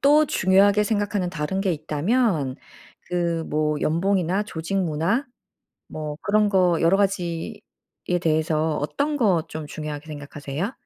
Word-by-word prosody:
또 300 +2 +5
중요하게 200 0 +4
생각하는 205 -3 0
다른 185 +3 -2
게 190 -3 +1
있다면 155 - 0 0.5
그 170 -2 -1
뭐 150 0 0
연봉이나 185 +3 +1
조직 170 -1 -4
문화 175 - 0 0.6
뭐 150 -1 -5
그런 210 0 +2
거 180 -4 +3
여러 170 +4 +4
가지에 180 -4 -1 0.6
대해서 155 -1 +1
어떤 285 - -1
거 190 - +3
좀 155 -1 -6
중요하게 150 0 -6
생각하세요? 150 - -5
170 Hz, 275 characters per minute, -24 LUFS, 155-200 Hz, 0.6 s, 또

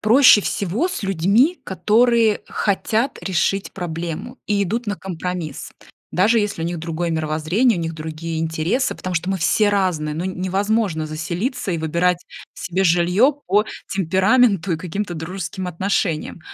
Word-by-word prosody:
"Проще 230 0 +7
всего 205 - -1
с 360 - -5
людьми, 200 - +2
которые 225 +2 +3
хотят 220 +5 0
решить 195 +1 0
проблему 175 +7 -5
и 205 -1 +1
идут 225 +5 -2
на 205 -2 -2
компромисс". 180 -3 -5 0.4
Даже 220 +5 +3
если 205 -5 -2
у - - -1
них 170 0 -3
другое 165 +1 -2
мировоззрение, 160 +8 +1
у - - -2
них 165 0 -3
другие 160 +1 -5
интересы, 165 +10 -1
потому 185 -1 -5
что 175 +3 -1
мы 190 - 0
все 185 +6 +3
разные. 180 -7 0
Ну, 165 +4 -3
невозможно 190 -2 -1
заселиться 175 - -3
и 170 - -1
выбирать 170 +3 +1 0.4
себе 185 +2 -2
жилье 180 - +4
по 210 +1 +3 0.2
темпераменту 190 +1 +2
и - - 0
каким-то 180 +3 -4
дружеским 180 +2 -5
отношениям. 175 -2 -1
185 Hz, 145 wpm, -21 LUFS, 165-210 Hz, 0.4 s, Проще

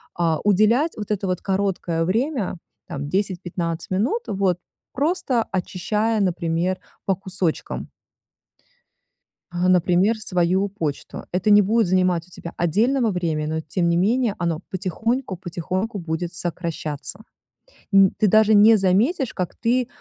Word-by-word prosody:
а, 165 -2 +1
уделять 215 - +3
вот 210 0 -5
это 200 -1 -1
вот 180 -1 -1
короткое 190 -4 -1
время, 225 - -1 0.3
там, 145 +1 -5
10-15 175 -3 -2
минут, 235 - 0
вот 190 -4 +1 0.4
просто 275 -5 0
очищая, 210 +4 -1
например, 175 0 0 0.3
по 195 - +2
кусочкам 185 -3 -3 1.6
а, 175 +1 0
например, 185 +4 +3
свою 185 0 +1
почту. 160 -8 -5
Это 185 +3 +1
не 205 0 +7
будет 220 +1 +2
занимать 180 -2 +1
у 180 - -22
тебя 170 -1 -8
отдельного 225 - +2
времени, 160 -4 -1
но 160 +1 -2
тем 170 +3 -1
не 170 - +2
менее 220 +4 +2
оно 170 -2 -1
потихоньку 200 +4 -2
потихоньку 185 +5 -3
будет 170 +1 -3
сокращаться. 170 0 -4 0.7
Н 195 -1 +6
ты 215 - +4
даже 215 +2 +5
не 215 +2 +7
заметишь, 220 - +1
как 180 -2 -3
ты, 245 +1 +1
185 Hz, 130 wpm, -22 LUFS, 175-215 Hz, 1.6 s, не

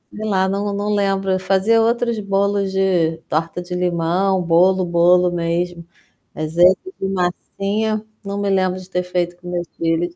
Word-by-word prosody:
Sei 215 +1 -5
lá, 190 -1 +2
não 200 +1 -2
não 205 +1 -1
lembro, 195 -1 0
eu 185 - +1
fazia 195 +4 +2
outros 235 0 +1
bolos 200 0 0
de 180 -4 +1
torta 165 +3 -2
de 180 0 -6
limão, 180 +2 +1
bolo, 180 +2 +3
bolo 175 +1 +4
mesmo. 170 0 -2 0.5
Mas 155 +1 -5
esse 180 +2 +6 0.2
de 195 - -2
massinha, 200 +4 -2 0.2
não 200 0 -4
me 200 0 -1
lembro 185 -1 +1
de 185 0 -13
ter 180 -1 -1
feito 175 -1 -2
com 180 0 -10
meus 175 -1 -3
filhos. 165 +1 -1
185 Hz, 170 wpm, -19 LUFS, 175-200 Hz, 0.5 s, esse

